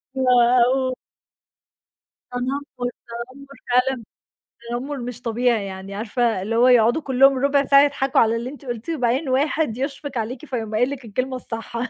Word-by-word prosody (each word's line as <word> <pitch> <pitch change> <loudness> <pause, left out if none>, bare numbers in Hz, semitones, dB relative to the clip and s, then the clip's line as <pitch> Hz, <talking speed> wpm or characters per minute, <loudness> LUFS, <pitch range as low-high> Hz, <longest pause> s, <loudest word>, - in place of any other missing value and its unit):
و 265 0 0 0.4
أو 260 0 +1 1.4
تنمُّر، 250 0 -3 0.4
تنمُّر 275 +1 -14 0.2
فعلًا 250 -1 +2 0.7
تنمُّر 265 +4 -4
مش 245 -1 -6
طبيعي، 235 -3 0
يعني 190 0 -8
عارفة 225 -1 -1
اللي 220 +4 -2
هو 245 +2 +5
يقعُدوا 240 +4 +4
كُلّهم 270 0 +4
رُبع 280 +1 +2
ساعة 275 0 +6
يضحكوا 280 -2 +1
على 225 0 +3
اللي 235 +2 -4
أنتِ 285 0 -12
قُلتيه 245 +6 -4
وبعدين 255 +3 0
واحد 280 -1 +1
يشفق 275 0 -4
عليكِ 235 +5 -4
فيقوم 225 -5 -4
قايل 245 +5 +2
لِك 275 -3 -7
الكلمة 255 +4 -3
الصح. 230 -2 -7
250 Hz, 150 wpm, -22 LUFS, 230-275 Hz, 1.4 s, ساعة